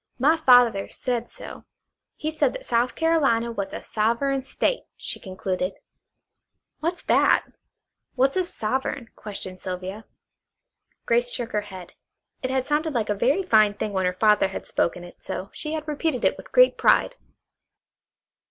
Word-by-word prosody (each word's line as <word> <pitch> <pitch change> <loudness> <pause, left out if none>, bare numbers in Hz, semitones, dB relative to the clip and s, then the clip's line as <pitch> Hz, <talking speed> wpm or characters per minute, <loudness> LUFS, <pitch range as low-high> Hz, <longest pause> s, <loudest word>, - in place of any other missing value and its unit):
My 290 +6 +4
father 245 -9 +5
said 240 -2 -3
so. - - -10 0.5
He 310 - -3
said 300 -4 +1
that - - -7
South 240 +1 +1
Carolina 275 -8 +2
was 200 -4 -4
a - - -6
Sovereign 235 +6 0
State," 270 - -1
she - - -6
concluded. 185 -1 -3 1.1
"What's 340 +3 -3
that? - - +4 0.7
What's 265 +1 +2
a 375 - +2
'sovereign'?" 255 -4 -3
questioned 190 -3 -7
Sylvia. 185 +3 -6 1.0
Grace 240 +1 +2
shook 240 -2 -3
her 210 - 0
head. 185 -4 -11 0.5
It 255 - -2
had 260 -1 0
sounded 300 +2 0
like 220 -3 0
a - - +3
very 270 - +1
fine 215 - +4
thing 210 0 -3
when 190 -1 +1
her 180 0 -2
father 210 -2 +4
had 190 - -7
spoken 175 +1 -1
it, 175 - -14
so 190 0 -5
she 305 0 -5
had 310 -1 -4
repeated 300 -3 -1
it - - +3
with - - -13
great - - +5
pride. - - +4
235 Hz, 155 wpm, -24 LUFS, 205-285 Hz, 1.1 s, father